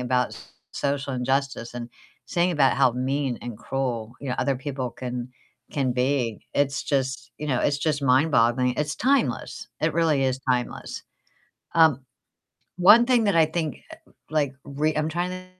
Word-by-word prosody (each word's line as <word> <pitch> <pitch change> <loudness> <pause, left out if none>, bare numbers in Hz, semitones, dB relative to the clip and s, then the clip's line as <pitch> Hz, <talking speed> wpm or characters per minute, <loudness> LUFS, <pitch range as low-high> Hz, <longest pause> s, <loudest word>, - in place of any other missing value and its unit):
about 125 0 0 0.4
social 140 -1 -2
injustice 130 -1 -1
and 120 -1 -5 0.4
singing 175 +5 +1
about 140 -5 +3
how 135 -2 +5
mean 130 +1 -1
and 120 -2 -7
cruel, 120 -2 -3
you 140 - -6
know, 125 - 0
other 140 -2 +1
people 130 -1 -4
can 125 0 -5 0.4
can 135 -3 0
be. 125 -3 0
It's 140 0 0
just 130 -3 -2
you 150 - -4
know, 130 -4 +1
it's 145 0 +1
just 150 -1 -1
mind-boggling. 125 -2 +3
It's 150 +1 -2
timeless, 275 +2 0
it - - +1
really 155 -5 +2
is 130 0 0
timeless. 125 -1 -2 0.7
Um, 160 -5 +5 0.7
one 210 +6 +7
thing 245 -3 +3
that 200 - +2
I 160 -1 +6
think, 155 -3 -3 0.5
like, 145 -4 0
re 150 +2 -1
I'm 155 +1 0
trying 175 +3 -2
to 185 0 -7
135 Hz, 160 wpm, -25 LUFS, 125-155 Hz, 0.7 s, one